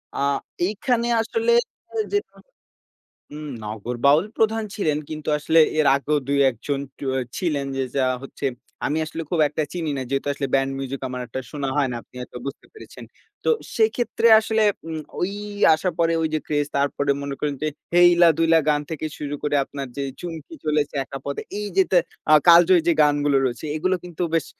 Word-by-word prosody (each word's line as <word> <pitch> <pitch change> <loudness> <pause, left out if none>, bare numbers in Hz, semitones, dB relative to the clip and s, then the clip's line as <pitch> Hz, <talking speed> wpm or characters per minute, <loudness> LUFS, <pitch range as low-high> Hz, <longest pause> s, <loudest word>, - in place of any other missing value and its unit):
আ - - -4 0.5
এইখানে 235 +4 0
আসলে 455 - 0 0.6
যে 410 - +3 1.1
হুম 150 +1 -8 0.2
নগর 110 +3 -5
বাউল 150 +5 +5
প্রধান 225 0 +2
ছিলেন 155 -8 0
কিন্তু 155 -1 -7
আসলে 160 +2 +2 0.2
এর 155 - +3
আগেও 150 +2 0
২ 140 - +2
১ 120 - -12
জন 140 -1 0 0.6
ছিলেন 150 -7 -1
যে, 135 - 0
যা 135 - +3 0.2
হচ্ছে 135 - -9 0.4
আমি 155 +2 0
আসলে 160 +1 -5
খুব 170 -3 +1
একটা 150 +1 -2
চিনি 165 -4 -3
না। 135 - -2
যেহেতু 140 +1 -1
আসলে 140 0 -3
ব্যান্ড 135 0 +2
মিউজিক 135 0 -4
আমার 125 0 -5
একটা 130 +3 -5
শোনা 140 -1 -3
হয় 140 -2 +2
না - - -3
আপনি - - -33
হয়তো 125 - -9
বুঝতে 140 - -7
পেরেছেন। 435 - -12 0.4
তো - - +3 0.3
সেক্ষেত্রে 255 - +1
আসলে 220 0 0 0.3
উম 160 -1 -4 0.7
আসার 175 +3 -1
পরে 165 0 +3
ওই 160 - +1
যে - - +2
ক্রেজ 145 -1 0
তারপরে 140 0 0
মনে 140 -1 -4
করেন 145 -1 -1
যে 155 - +1 0.3
হেইলা 175 -1 +7
দুইলা 165 0 +4
গান 150 -1 +3
থেকে 155 0 -3
শুরু 145 -1 -4
করে 145 0 +1
আপনার 140 0 -6
যে 140 - -2 0.2
চুমকি 170 - -7
চলেছে 150 -1 0
একা 135 - -7
পথে 140 - -4 0.2
এই 210 - -3
যে 190 - +7 0.5
আ - - +10
কালজয়ী 175 +1 +7
যে - - +6
গানগুলো 145 -1 +2
রয়েছে 120 +4 -4
এগুলো 185 +4 +1
কিন্তু 175 0 -6
বেশ 165 - +1
150 Hz, 180 wpm, -23 LUFS, 140-175 Hz, 1.1 s, আ